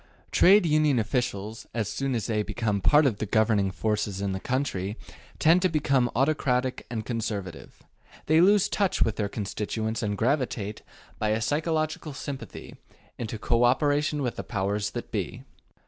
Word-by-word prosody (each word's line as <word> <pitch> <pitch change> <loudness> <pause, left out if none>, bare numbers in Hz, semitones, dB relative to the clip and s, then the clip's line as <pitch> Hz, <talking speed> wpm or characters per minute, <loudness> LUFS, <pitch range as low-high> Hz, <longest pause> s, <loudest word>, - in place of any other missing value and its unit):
Trade 195 +1 +6
Union 150 -3 +3
officials, 110 -2 -2
as 110 -3 -1
soon 135 +2 -2
as 110 -4 -2
they 110 -2 0
become 105 -2 -2
part 150 +8 +5
of 115 -7 +1
the 110 - -2
governing 105 -2 +2
forces 105 0 -2
in 100 -1 -1
the 95 - -3
country, 110 -5 -2 0.4
tend 165 +3 +4
to 185 - +3
become 140 -5 +2
autocratic 130 -2 0
and 110 -2 -4
conservative; 100 - -5 0.4
they 160 +2 +4
lose 200 +1 +5
touch 200 -3 +1
with 110 -2 -2
their 105 -2 -1
constituents 110 +2 -3
and 105 -2 -2
gravitate, 120 -4 -1 0.4
by 105 - 0
a 110 +1 +1
psychological 155 +3 -1
sympathy, 135 -4 -7 0.4
into 110 -1 -4
co 120 +2 +1
operation 145 +3 +2
with 125 - -2
the - - -4
powers 100 -1 -1
that - - -7
be. - - -4
115 Hz, 160 wpm, -27 LUFS, 105-145 Hz, 0.4 s, Trade